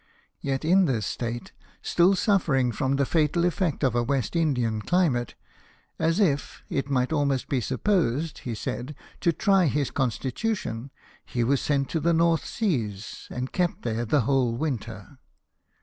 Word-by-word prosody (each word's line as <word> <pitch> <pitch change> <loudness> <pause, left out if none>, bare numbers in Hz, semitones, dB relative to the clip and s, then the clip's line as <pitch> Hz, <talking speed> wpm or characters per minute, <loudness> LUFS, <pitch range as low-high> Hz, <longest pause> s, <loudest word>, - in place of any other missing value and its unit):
Yet 135 +1 -2
in 185 +3 +5
this 115 - 0
state, 120 +3 -4 0.3
still 180 +3 +4
suffering 160 - +2
from 130 +4 0
the 140 0 +2
fatal 165 +3 +2
effect 175 -3 0
of 130 -3 +3
a 120 - +2
West 135 +4 -1
Indian 125 -9 +1
climate, 135 - +1 0.6
as 165 +4 +1
if, 145 -9 0
it 140 0 -1
might 130 +1 +1
almost 140 -3 0
be 130 -3 0
supposed, 160 - 0
he 120 -3 -5
said, 125 +6 -5 0.2
to 170 - +3
try 190 +2 +3
his 145 -1 0
constitution, 130 - -2 0.3
he 120 - -2
was 135 +3 +2
sent 140 -2 +1
to 165 - -1
the 170 +3 +2
North 165 0 +2
Seas, 110 - -2
and 125 +1 -4
kept 180 -2 0
there 115 0 -1
the 135 +5 +2
whole 125 -1 +1
winter. 120 -3 -4
140 Hz, 155 wpm, -26 LUFS, 120-165 Hz, 0.6 s, in